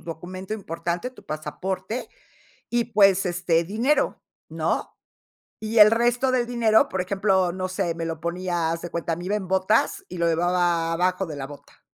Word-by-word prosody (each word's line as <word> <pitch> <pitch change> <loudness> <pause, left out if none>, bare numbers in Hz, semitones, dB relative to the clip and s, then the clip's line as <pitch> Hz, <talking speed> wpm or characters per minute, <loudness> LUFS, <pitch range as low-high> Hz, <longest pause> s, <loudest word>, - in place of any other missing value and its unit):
documento 185 +4 -6
importante, 170 +2 -4
tu 255 - -17
pasaporte, 185 +9 -4 0.6
y 240 -1 0
pues, 195 -4 +4
este, 175 -2 +1
dinero, 225 - 0 0.3
¿no? - - -2 0.6
Y 220 +1 -1
el 210 0 +9
resto 240 +3 +2
del 250 -2 +1
dinero, 235 +2 +3
por 190 - -2
ejemplo, 190 -1 +1
no 185 0 -3
sé, 185 -2 -1
me 165 0 -4
lo 165 -1 -4
ponía, 170 -1 -1
haz 165 0 -3
de 175 - -6
cuenta, 170 -1 -2
me 175 - -7
iba 200 +3 -1
en 190 -3 -5
botas 190 +3 +1
y 180 - -6
lo 170 - +2
llevaba 170 0 +1
abajo 185 +3 +1
de 155 -4 -7
la 135 -1 -5
bota. 145 0 -14
185 Hz, 175 wpm, -24 LUFS, 170-215 Hz, 0.6 s, el